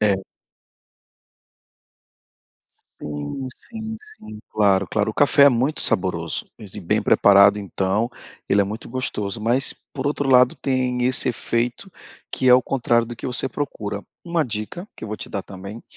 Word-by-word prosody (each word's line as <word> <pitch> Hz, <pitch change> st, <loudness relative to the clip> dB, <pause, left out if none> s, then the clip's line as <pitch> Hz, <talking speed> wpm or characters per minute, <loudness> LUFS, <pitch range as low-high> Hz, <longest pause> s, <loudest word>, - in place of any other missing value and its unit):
É. 100 Hz, -2 st, +2 dB, 2.8 s
Sim, 75 Hz, -, -5 dB
sim, 220 Hz, -1 st, -7 dB
sim, 110 Hz, -, -13 dB
claro, 100 Hz, -2 st, +2 dB
claro. 105 Hz, 0 st, 0 dB
O -, -, -11 dB
café 145 Hz, 0 st, +4 dB
é -, -, +9 dB
muito 130 Hz, +5 st, 0 dB
saboroso 85 Hz, -3 st, -1 dB
e -, -, -9 dB
bem -, -, 0 dB
preparado 100 Hz, 0 st, +6 dB
então, 100 Hz, +3 st, -1 dB, 0.4 s
ele 100 Hz, -, +3 dB
é -, -, 0 dB
muito 105 Hz, +3 st, -7 dB
gostoso, 115 Hz, -4 st, -3 dB
mas 120 Hz, +5 st, +1 dB, 0.2 s
por 140 Hz, -1 st, -4 dB
outro 145 Hz, -1 st, -1 dB
lado 125 Hz, 0 st, +6 dB
tem 125 Hz, -2 st, -1 dB
esse 125 Hz, 0 st, +3 dB
efeito 120 Hz, -, -2 dB, 0.4 s
que 130 Hz, -, +1 dB
é 125 Hz, -, +9 dB
o 125 Hz, -, +4 dB
contrário 120 Hz, -3 st, +1 dB
do 120 Hz, -, -7 dB
que 115 Hz, -, -7 dB
você 130 Hz, +1 st, -1 dB
procura. 105 Hz, -7 st, -4 dB, 0.2 s
Uma 170 Hz, -2 st, 0 dB
dica, 120 Hz, -, -5 dB
que -, -, -8 dB
eu -, -, -7 dB
vou 105 Hz, -, -4 dB
te -, -, -7 dB
dar 100 Hz, -, -4 dB
também, 100 Hz, +3 st, -9 dB
115 Hz, 160 wpm, -22 LUFS, 100-130 Hz, 2.8 s, é